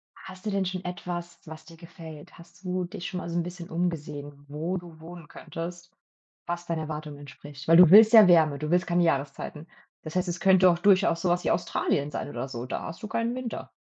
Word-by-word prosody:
hast 185 +1 -13
du 210 - -1
denn 195 -1 0
schon 185 0 -5
etwas, 175 -1 -6
was 160 -1 -11
dir 165 +1 -14
gefällt? 165 -3 -12
Hast 170 +2 -18
du 180 0 -2
dich 180 0 -7
schon 185 - -5
mal 170 - -6
so 170 - -5
'n 170 - 0
bisschen 175 0 -9
umgesehen, 145 -4 -4
wo 160 +6 -3
du 170 -2 -11
wohnen 170 -1 -11
könntest, 175 +3 -8 0.5
was 175 0 -4
deinen 165 -1 -3
Erwartungen 155 -1 -6
entspricht? 145 +1 -12
Weil 165 - +6
du 180 -2 +8
willst 220 +3 +8
ja 220 -2 +10
Wärme, 155 -4 +4
du 155 +1 -4
willst 180 +1 +2
keine 175 0 +2
Jahreszeiten. 150 +1 -2 0.4
Das 155 +1 -8
heißt, 180 0 0
es 175 +1 -4
könnte 190 -1 +5
auch 170 -1 +1
durchaus 185 -3 +3
so 185 - -1
was 175 +1 0
wie - - +1
Australien 165 -4 -1
sein - - -5
oder 125 -1 -5
so. 120 -2 -6
Da 130 - -5
hast 165 +7 -9
du - - -4
keinen 230 +2 -2
Winter. 255 -3 -6
170 Hz, 225 wpm, -26 LUFS, 155-180 Hz, 0.5 s, ja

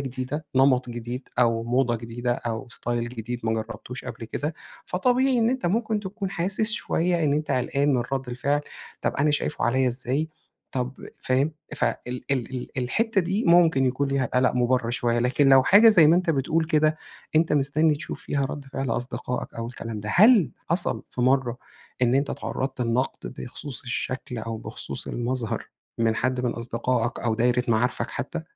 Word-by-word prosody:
جديدة، 130 +4 -4
نَمَط 130 -1 +4
جديد، 120 +2 -6
أو 115 -2 +3
موضة 120 0 +1
جديدة، 120 +2 -3
أو 115 0 -4
ستايل 120 0 -2
جديد 120 0 -5
ما 110 0 0
جرّبتوش 115 +3 -5
قبل - - -7
كده. 150 +7 -3 0.3
فطبيعي 250 +7 +2
إن 230 0 +3
أنت 260 -6 -1
ممكن 215 +3 0
تكون 195 0 -5
حاسس 195 +5 +2
شوية 175 -4 0
إن 145 - +2
أنت 150 +1 -1
قلقان 140 +2 +1
من 125 - +1
رَد 135 -1 -2
الفعل. 140 +4 0 0.4
طب - - -1
أنا 150 +2 +2
شايفه 150 +1 -1
عليّا 130 +2 +2
إزاي، 130 +5 -1 0.4
طب 125 0 -2 0.3
فاهم؟ 135 +5 +1 0.2
فال - - +1
ال 125 0 -5
ال 125 -1 -3
الحتّة 200 - +1
دي، 190 +5 -1
ممكن 165 -6 +5
يكون 130 +2 0
ليها 135 -1 +1
قَلَق 125 0 +3
مُبَرّر 125 -1 +1
شوية. 120 -1 0
لكن 125 +4 +3
لو 135 -1 +7
حاجة 205 - +7
زي 175 -8 +7
ما 165 +3 +6
أنت 180 -2 +1
بتقول 160 +3 +1
كده، 155 -1 +2 0.4
أنت 160 0 +3
مستنّي 150 +2 +3
تشوف 150 +4 -7
فيها 140 -1 -1
رَد 140 +1 -5
فعل 135 -1 -4
أصدقائك 125 +1 -3
أو 115 0 -4
الكلام 115 -3 -6
ده. 105 - -6
هل 215 - +6 0.2
حصل 170 +3 +1
في - - -5
مرّة 125 -1 +2 0.5
إن 125 0 +4
أنت 140 +1 +1
اتعرّضت 130 0 -4
لنَقد 125 +2 -1
بخصوص 130 +2 -4
الشكل، 125 -1 -4
أو 115 0 -4
بخصوص 110 - -3
المظهر 120 -1 -2 0.3
من 115 -1 +2
حد 130 +1 0
من 125 - +1
أصدقائك، 120 +1 -2
أو 115 -2 0
دايرة 125 +2 +2
معارفك 115 +2 +1
حتّى؟ 160 +4 -4
130 Hz, 175 wpm, -25 LUFS, 120-155 Hz, 0.5 s, لو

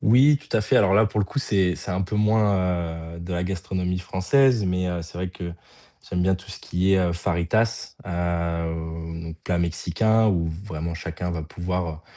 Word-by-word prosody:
Oui 135 +6 +6
tout 135 - -2
à - - +3
fait. 105 - +2
Alors 95 -1 +5
là 110 +1 +6
pour 105 0 -1
le - - +2
coup 140 - -4
c'est 95 -8 +2
c'est - - -6
un 95 +1 0
peu 105 +3 -3
moins, 90 -6 +1
heu, - - -9
de 85 +2 -5
la 90 0 -1
gastronomie 90 0 -2
française 105 +6 +3
mais 90 0 0
heu, 90 -1 -2
c'est 85 +1 -10
vrai 90 0 -2
que 85 -1 -6 0.6
j'aime 90 0 +1
bien 95 +1 +3
tout 95 +2 -10
ce 100 - -7
qui 95 +2 0
est, 95 - +4
heu, 90 -2 +2
fajitas, 85 +5 0
heu, 85 -1 -1
oh 80 0 -5
donc 80 -1 -7
plat 90 - 0
mexicain 85 +6 +2
où 85 -4 +1 0.2
vraiment 85 -3 -4
chacun 85 +1 -4
va 80 -2 -3
pouvoir, 85 0 -3
90 Hz, 205 wpm, -24 LUFS, 85-100 Hz, 0.6 s, Oui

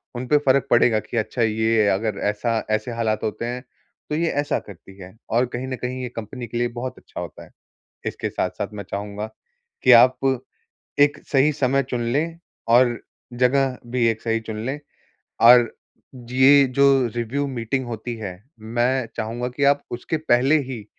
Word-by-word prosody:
उनपे 125 +5 +2
फ़र्क 135 0 +3
पड़ेगा 120 -2 +4
कि 120 - -6
अच्छा 115 +2 -2
ये 110 0 +2
अगर 105 +1 -1
ऐसा 115 +2 -1
ऐसे 110 +3 -1
हालात 115 -2 -1
होते 110 +2 -3
हैं, 125 +1 -4 0.5
तो 150 - -1
ये 165 +1 +1
ऐसा 145 0 -1
करती 95 0 -14
है, 90 +3 -11
और 120 +3 +2
कहीं 125 +2 -4
न 130 - -3
कहीं 130 +1 -3
ये 125 - -4
कंपनी 115 +2 -6
के 115 - -5
लिए 120 0 +1
बहुत 130 +1 -5
अच्छा - - -10
होता - - -8
है। - - -21 0.6
इसके - - -3
साथ-साथ 90 +2 -3
मैं 100 -1 -6
चाहूँगा 105 +1 -4 0.6
कि - - +7
आप 130 0 +3 0.8
एक 145 0 +4
सही 140 +2 +4
समय 140 -1 +1
चुन 120 -1 -1
लें, 165 +4 -1 0.3
और 120 0 +4 0.4
जगह 130 +1 +2
भी 120 0 0
एक 110 -1 -5
सही 115 -1 0
चुन 110 -1 -6
लें, 135 +3 -2 0.6
और 120 0 +7 0.6
ये 135 +2 +6
जो 135 -2 +5
रिव्यू 125 +5 -2
मीटिंग 130 0 -2
होती 120 +1 -5
है, 95 -5 -7 0.2
मैं 120 +3 0
चाहूँगा 120 +3 -3
कि 125 +3 -3
आप 140 +1 +3
उसके 125 +7 -3
पहले 140 0 +3
ही 115 -6 -6
120 Hz, 175 wpm, -22 LUFS, 110-130 Hz, 0.8 s, कि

